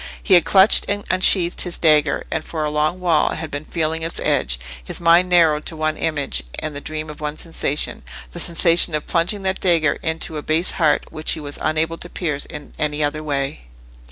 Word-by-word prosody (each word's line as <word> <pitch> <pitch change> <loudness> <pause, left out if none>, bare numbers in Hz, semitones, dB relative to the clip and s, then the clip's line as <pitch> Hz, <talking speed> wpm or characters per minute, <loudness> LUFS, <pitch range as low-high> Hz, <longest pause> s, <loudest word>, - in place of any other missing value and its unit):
He 195 - +2
had 175 -2 +6
clutched 195 +1 +5
and 205 0 -2
unsheathed 185 -1 +3
his 175 -2 -2
dagger, 150 -3 +2
and 160 - -2
for 155 -1 -4
a 150 - -1
long 155 +4 0
while 170 -4 +1
had 160 - -6
been 145 +2 -5
feeling 160 -1 -2
its 165 +1 -3
edge, - - 0 0.2
his - - 0
mind 170 +2 +4
narrowed 160 -4 +4
to 165 - -4
one 155 0 -1
image, 145 - -2 0.2
and 155 -2 -4
the 145 - -5
dream 155 +1 -5
of 150 0 -10
one 150 0 -4
sensation—the 135 - -4
sensation 170 -1 +3
of 150 - -3
plunging 180 +4 -1
that 190 0 -1
dagger 165 -5 +2
into 160 -1 -1
a - - -4
base 160 +4 +2
heart, 155 -4 +1
which 155 0 -1
he - - -5
was 145 -1 -5
unable 160 +1 0
to 175 - -7
pierce 150 -6 -3
in 150 - -10
any 150 0 0
other 150 +1 -2
way. 140 - -3
155 Hz, 205 wpm, -20 LUFS, 150-170 Hz, 0.2 s, had